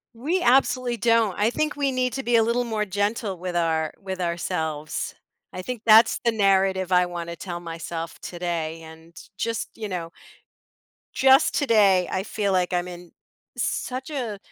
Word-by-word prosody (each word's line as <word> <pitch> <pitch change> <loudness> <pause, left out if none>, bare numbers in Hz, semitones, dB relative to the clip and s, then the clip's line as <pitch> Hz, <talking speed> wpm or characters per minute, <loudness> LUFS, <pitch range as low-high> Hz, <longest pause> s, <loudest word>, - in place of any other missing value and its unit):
We 320 +10 -1
absolutely 250 -1 +2
don't. 230 -3 +2
I 215 +3 +2
think 305 +2 -1
we 280 -2 0
need 255 -1 0
to 270 0 -3
be 240 0 +1
a 225 - +6
little 235 +2 +1
more 220 -3 -1
gentle 205 0 -2
with 180 0 -5
our 160 -2 0
with 190 -1 -5
ourselves. 160 -3 -3 0.4
I 185 - -5
think 245 +2 -5
that's 220 +1 +6
the 235 - +4
narrative 190 -3 +2
I 180 0 +5
wanna 170 -1 -6
tell 175 -2 -6
myself 165 0 -6
today 170 -2 -4
and 160 +1 -14 0.2
just, 230 0 -2
you 215 -2 -5
know 170 -3 -4 1.0
just 265 +2 +5
today, 205 - +4
I 190 - -1
feel 205 -2 -2
like 180 -1 +1
I'm 175 0 0
in 175 -1 -10 0.5
such 260 +3 -3
a 240 -9 -4
195 Hz, 165 wpm, -24 LUFS, 175-235 Hz, 1.0 s, a